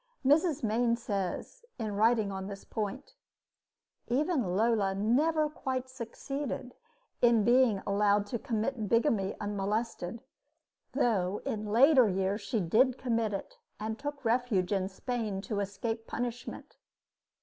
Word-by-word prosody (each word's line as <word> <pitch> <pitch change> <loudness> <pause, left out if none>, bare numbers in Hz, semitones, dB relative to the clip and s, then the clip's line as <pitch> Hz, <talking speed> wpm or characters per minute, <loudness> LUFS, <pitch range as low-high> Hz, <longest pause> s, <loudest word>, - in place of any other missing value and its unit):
Mrs. 305 +1 +3
Mayne 230 +2 +2
says, 205 - -4
in 215 -3 -3
writing 220 -1 +3
on 190 0 -5
this 200 -1 -7
point: 220 +6 -5 0.9
Even 255 - +1
Lola 210 -3 +2
never 300 +10 +2
quite 260 -4 -3
succeeded 260 +1 -5 0.5
in 235 -3 +5
being 240 -3 +4
allowed 205 0 +2
to 225 +3 -4
commit 225 -3 -2
bigamy 230 -5 +2
unmolested, 210 +1 -2 0.7
though 205 -8 +1
in 215 -1 -3
later 255 +2 +6
years 195 +2 0
she 200 +3 -1
did 240 +9 +3
commit 230 -4 0
it 195 - -6 0.2
and 220 +1 -4
took 290 -2 -5
refuge 225 -5 +1
in 190 -1 0
Spain 220 -1 -3
to 205 +1 -3
escape 225 +3 -3
punishment. 245 0 -5
225 Hz, 125 wpm, -30 LUFS, 200-250 Hz, 0.9 s, later